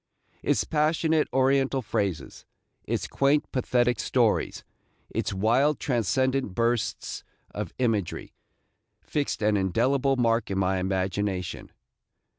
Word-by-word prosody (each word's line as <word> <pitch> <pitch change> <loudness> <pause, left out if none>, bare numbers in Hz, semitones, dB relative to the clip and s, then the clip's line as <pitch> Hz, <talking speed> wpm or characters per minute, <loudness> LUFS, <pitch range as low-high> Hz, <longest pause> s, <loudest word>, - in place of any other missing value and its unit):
Its - - +1
passionate 155 0 +1
Oriental 135 0 +2
phrases, 100 -5 -3 0.4
its - - -2
quaint, 140 +2 +2
pathetic 125 -2 +1
stories, 120 -2 +1 0.5
its - - -2
wild, 120 +10 +2
transcendent 130 -2 0
bursts 115 0 -1 0.3
of - - -5
imagery, 110 -8 -1 0.7
fixed 145 -6 -2
an 105 0 +3
indelible 125 +8 +2
mark 115 -2 +1
in 95 - -2
my 95 0 +1
imagination. 95 0 -2
120 Hz, 100 wpm, -26 LUFS, 100-135 Hz, 0.7 s, an